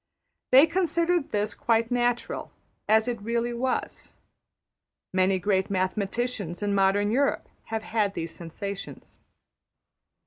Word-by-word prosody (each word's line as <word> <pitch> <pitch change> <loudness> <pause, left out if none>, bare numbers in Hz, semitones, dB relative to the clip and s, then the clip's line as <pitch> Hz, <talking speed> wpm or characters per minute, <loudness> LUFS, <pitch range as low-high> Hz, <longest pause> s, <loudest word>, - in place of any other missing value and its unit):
They 270 +4 +8
considered 340 -1 +1
this 210 0 -1
quite 230 0 +1
natural, 245 -1 -1 0.4
as 220 +2 +4
it 235 -3 -2
really 235 +2 -1
was. 255 +2 -3 1.0
Many 185 +1 +3
great 190 0 0
mathematicians 200 0 -2
in 205 -1 0
modern 200 +1 +3
Europe 275 +4 +1 0.2
have 220 0 -3
had 210 -3 0
these 165 0 -4
sensations. 195 +4 -7
220 Hz, 110 wpm, -26 LUFS, 195-245 Hz, 1.0 s, They